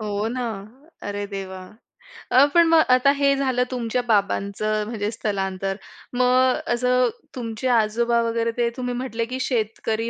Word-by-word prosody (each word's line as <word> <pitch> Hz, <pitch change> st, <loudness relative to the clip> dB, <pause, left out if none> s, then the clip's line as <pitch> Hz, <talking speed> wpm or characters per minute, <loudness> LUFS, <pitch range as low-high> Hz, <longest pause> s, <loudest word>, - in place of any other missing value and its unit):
हो 210 Hz, 0 st, -2 dB
ना. 250 Hz, +1 st, -3 dB, 0.6 s
अरे 205 Hz, 0 st, -4 dB
देवा! 195 Hz, -2 st, -6 dB, 0.7 s
अ, 265 Hz, +3 st, +7 dB
पण 340 Hz, -1 st, +6 dB
मग 325 Hz, -1 st, +6 dB
आता 255 Hz, +2 st, +5 dB
हे 280 Hz, 0 st, +3 dB
झालं 260 Hz, -2 st, +1 dB
तुमच्या 245 Hz, 0 st, -1 dB
बाबांचं 210 Hz, 0 st, 0 dB
म्हणजे 215 Hz, -2 st, -3 dB
स्थलांतर. 195 Hz, -3 st, -2 dB, 0.4 s
मग 255 Hz, +1 st, +3 dB
असं 250 Hz, 0 st, +2 dB, 0.3 s
तुमचे 230 Hz, 0 st, -4 dB
आजोबा 235 Hz, +1 st, +2 dB
वगैरे, 230 Hz, 0 st, 0 dB
ते 235 Hz, -1 st, +2 dB
तुम्ही 250 Hz, -1 st, -3 dB
म्हटले 240 Hz, -2 st, -3 dB
की 255 Hz, +2 st, -5 dB
शेतकरी 225 Hz, -2 st, -1 dB
235 Hz, 145 wpm, -23 LUFS, 210-250 Hz, 0.7 s, अ